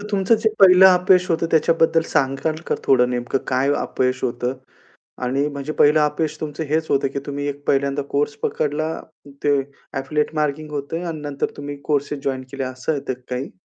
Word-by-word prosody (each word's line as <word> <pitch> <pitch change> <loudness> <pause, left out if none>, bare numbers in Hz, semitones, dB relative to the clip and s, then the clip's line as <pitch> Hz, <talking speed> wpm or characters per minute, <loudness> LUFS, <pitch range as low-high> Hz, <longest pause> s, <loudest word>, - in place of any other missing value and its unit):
तर 205 - -8
तुमचं 195 +2 +3
जे 220 - +4
पहिलं 190 0 +8
अपयश 180 0 +4
होतं 165 0 +1
त्याच्याबद्दल 165 0 +3
सांगाल 135 +3 0
का - - +1
थोडं 125 -2 +4
नेमकं 120 +1 -1
काय 135 +2 +2
अपयश 130 0 -1
होतं 125 +1 -2 0.7
आणि 135 +3 0
म्हणजे 140 +1 -5
पहिलं 150 +1 +6
अपयश 150 +1 0
तुमचं 155 +1 -4
हेच 160 +2 0
होतं 135 0 +2
की - - 0
तुम्ही 145 0 -3 0.2
पहिल्यांदा 140 +1 +1
कोर्स 145 +1 0
पकडला 155 +1 -1 0.5
ते 145 -1 +4 0.4
एफिलिएट 150 +3 -1
मार्केटिंग 150 0 -2
होतं 150 +4 -4
आणि 160 -2 -5
नंतर 145 -1 -3
तुम्ही 145 0 -6
कोर्सेस 145 -1 -1
जॉइन 130 -1 -1
केले 135 -1 -3
असं 130 +3 -3
येतं 140 -2 -3 0.2
काही. 125 +2 -3
145 Hz, 170 wpm, -21 LUFS, 135-160 Hz, 0.7 s, पहिलं